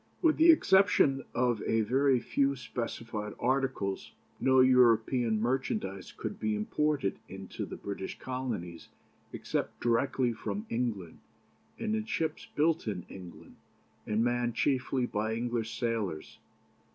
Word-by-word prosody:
With 325 -3 +3
the 325 +1 +6
exception 190 - +4
of 120 -3 +1
a 115 - +2
very 130 +4 +3
few 140 +3 +1
specified 115 -4 -5
articles 130 -6 -1 0.3
no 130 0 +4
European 120 -2 +4
merchandise 110 -6 -2
could - - -6
be 110 -1 0
imported 135 +1 0
into 95 0 -6
the - - -7
British 100 -1 -6
Colonies 120 -10 -5 0.4
except - - -3
directly 120 +1 +1
from 105 -2 -4
England, 110 -8 -3 0.6
in 220 -1 -1
ships 160 -7 -2
built 160 -2 +2
in 95 -5 -3
England, 90 -2 -11 0.5
and 110 +1 +1
manned 120 -1 0
chiefly 130 -1 +1
by 110 -1 -2
English 115 -1 -2
sailors. 110 -9 -3
120 Hz, 120 wpm, -30 LUFS, 105-135 Hz, 0.6 s, the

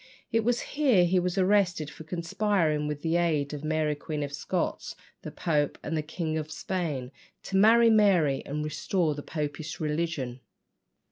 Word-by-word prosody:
It 225 0 +2
was 240 +1 +1
here 260 -12 +3
he 180 +1 +3
was 180 +1 -2
arrested 185 -6 +2
for - - -11
conspiring, 170 -2 0
with 150 -1 -4
the 165 +1 +2
aid 155 -4 0
of 145 0 -6
Mary 155 -1 0
Queen 150 0 -4
of 140 0 -5
Scots, 140 - -3 0.3
the - - -6
Pope, 150 -3 0
and 160 - -3
the 155 - 0
King 160 0 -3
of 155 0 -6
Spain, 155 -7 -3 0.3
to 195 - -5
marry 225 +3 +6
Mary 185 -10 +3
and 150 +2 -3
restore 155 +2 0
the 145 - -6
Popish 150 +1 -5
religion. 150 -5 -2
160 Hz, 165 wpm, -28 LUFS, 150-185 Hz, 0.3 s, marry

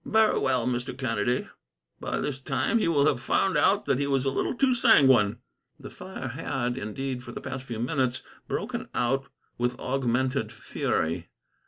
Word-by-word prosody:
"Very 220 0 +3
well, 130 -3 +2
Mr. 125 +1 -2
Kennedy. 120 -1 0 0.5
By - - -3
this 140 -3 -3
time, 230 +11 0
he - - +1
will 145 -4 +3
have 130 -5 +2
found 190 +8 +1
out 195 +7 +3
that 135 -1 +1
he 140 - 0
was 135 -1 +1
a 135 - +2
little - - -1
too 260 +1 +3
sanguine." 135 - +5 0.4
The - - -9
fire 185 -9 -7
had, 130 -3 -2
indeed, 125 +2 -4
for 120 - -9
the - - -5
past 130 0 -6
few 120 -3 -5
minutes 130 +1 -1 0.2
broken - - -3
out 135 +3 +1 0.3
with 120 0 -1
augmented 130 -2 0
fury. 85 -6 -2
130 Hz, 170 wpm, -27 LUFS, 120-140 Hz, 0.5 s, sanguine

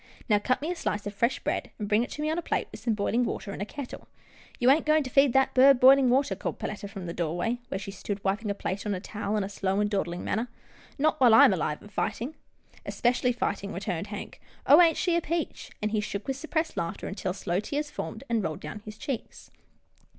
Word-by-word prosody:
" - - -24
Now 210 - +5
cut 255 +5 0
me 325 - -1
a - - -2
slice 205 -11 -2
of 205 - -4
fresh 235 +5 +1
bread, - - -2
and 210 - -4
bring 210 +2 +3
it 245 - -2
to 300 - -4
me 305 - 0
on 325 - 0
a - - -3
plate, - - -1
with - - -9
some 225 -1 0
boiling 220 +4 +1
water 200 -3 -4
in - - -6
a 205 - -3
kettle." 280 0 -8 0.3
" - - -24
You 250 +2 +5
ain't 305 +2 +2
goin' 310 0 +4
to 255 - -7
feed 275 -1 +5
that 265 0 +3
bird 265 0 +7
b'ilin' 265 +1 +7
water," 255 -5 +2
called 195 - -4
Perletta 205 -1 -5
from 195 -3 -7
the 170 - -4
doorway, 175 +9 -1
where - - -3
she 195 0 -6
stood 200 +1 -5
wiping 205 +3 -1
a 200 - -1
plate 200 0 -3
on 205 - 0
a - - -4
towel 210 +2 -3
in 210 - 0
a - - -3
slow 195 0 -1
and 210 0 +1
dawdling 175 -3 -2
manner, 225 +4 -1 0.3
" - - -25
not 310 +2 +2
while 240 -3 +7
I'm 225 - +8
alive 155 -4 -2
and 205 - -14
fightin'." 255 +7 -2 0.3
" - - -38
Especially 245 +1 +1
fightin'," 200 -4 -2
returned 185 -1 -3
Hank, 205 0 -8
" - - -28
oh, 300 +5 +8
ain't 330 -3 +5
she 350 -2 +1
a 340 - +2
peach! 330 0 -3
" - - -38
and 215 - 0
he 215 - +1
shook 200 0 -5
with 270 - -1
suppressed 320 +3 -2
laugh 170 0 -2
ter, - - -6
until 190 -1 -3
slow 180 -1 -2
tears 290 +7 -3
formed - - -6
and 230 -2 +1
rolled 155 -3 -3
down 150 +7 -6
his 210 -1 -9
cheeks. 255 0 -6
215 Hz, 265 wpm, -28 LUFS, 200-270 Hz, 0.3 s, I'm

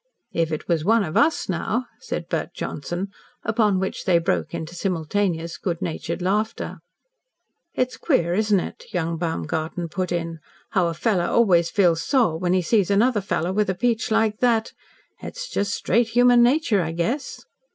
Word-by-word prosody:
"If 165 -1 0
it 155 - -4
was 165 -3 +1
one 225 +4 +4
of 155 -4 -5
US, 315 +2 +3
now," 215 +7 -1
said - - -5
Bert - - -3
Johnson. 180 +3 -4 0.3
Upon 215 -4 +2
which 190 - -3
they 180 -2 +4
broke 90 - 0
into 160 +1 -5
simultaneous 170 -1 -1
good 170 -3 -2
natured 175 +2 -4
laughter. 210 +4 -1 1.0
"It's 255 0 -1
queer, 175 - +1
isn't 210 0 +3
it," - - -7
young 165 -1 -1
Baumgarten 160 - -3
put 185 +1 -3
in, 165 -1 -3 0.3
"how 185 -4 +2
a 165 - -3
fellow 180 -1 +1
always 175 -7 +3
feels 175 -4 +3
sore 235 - +2
when 180 0 +1
he 185 -1 +2
sees 200 0 +2
another 210 +2 +3
fellow 180 -2 -1
with 210 0 +1
a 190 - 0
peach 230 +3 0
like 220 -1 +1
that? 230 -3 +2 0.5
It's - - -6
just 200 - -1
straight 235 +5 +1
human 245 +1 +5
nature, 240 -5 +3
I 165 -1 -3
guess." 235 - -3
190 Hz, 170 wpm, -23 LUFS, 170-225 Hz, 1.0 s, human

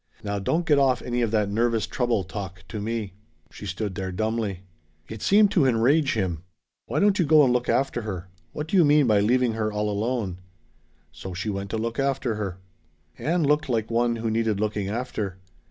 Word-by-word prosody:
Now 100 0 -2
don't 160 - 0
get 150 -3 +4
off 130 -3 +2
any 120 0 -1
of 115 - +1
that 105 -2 +1
'nervous 115 +1 +1
trouble' 120 -5 0
talk 95 -1 -7
to 110 -3 -5
me!" 110 -3 -3 0.4
She - - -9
stood 100 +2 -3
there 95 0 -4
dumbly. 110 -1 -2 0.5
It 110 -1 -8
seemed 205 0 +5
to 155 -8 +3
enrage 130 +5 +3
him. 90 -7 -1 0.5
"Why - - -1
don't 205 -1 +3
you - - +5
go 155 -1 +6
and 125 -3 +3
look 125 0 0
after 135 -2 +1
her! 95 -4 -5 0.2
What 150 - -5
do 180 - -2
you 175 - +7
mean 150 -1 +5
by 105 -4 +4
leaving 120 +3 +2
her 110 -1 -1
all 105 0 -1
alone?" 105 -3 -2 0.7
So 95 -2 -8
she 100 +4 -2
went 100 0 -4
to 110 - -2
look 115 +2 -3
after 135 -3 0
her. 100 -4 -4 0.6
Ann 170 +2 +1
looked 150 0 +2
like 115 -2 -1
one 120 0 +2
who 115 -1 -2
needed 110 -2 0
looking 105 -2 -1
after. 105 -4 -3
115 Hz, 205 wpm, -25 LUFS, 100-130 Hz, 0.7 s, you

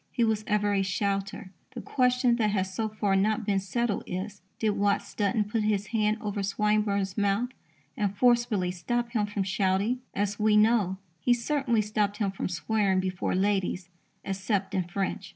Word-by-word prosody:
He 240 - +1
was 220 -1 +1
ever 205 -1 +1
a 195 - +2
shouter. 195 +1 -2 0.2
The 240 - -5
question 250 -2 +2
that 215 -3 +2
has 190 -2 -1
so 220 +3 -1
far 210 -2 0
not 215 +3 +1
been 200 -2 +2
settled 215 +3 -1
is: 190 +2 -5 0.2
Did 220 -1 +1
Watts 200 0 0
Dunton 210 +1 +1
put 210 +2 -2
his 210 -1 +1
hand 215 -1 +2
over 205 -1 -3
Swinburne's 200 -1 0
mouth 205 +4 +1 0.5
and 200 -1 -1
forcibly 235 -7 +3
stop 235 +7 -2
him 215 -3 0
from 205 -1 -2
shouting? 195 +5 0 0.2
As 205 +1 -1
we 210 0 +4
know, 210 -4 +3 0.2
he 245 +7 +3
certainly 240 -3 0
stopped 210 -1 -1
him 205 -3 0
from 195 - -4
swearing 190 +4 +1
before 185 -1 -1
ladies, 190 -2 0 0.4
except 195 0 -1
in 185 -2 0
French. 190 +1 -3
205 Hz, 170 wpm, -28 LUFS, 195-220 Hz, 0.5 s, we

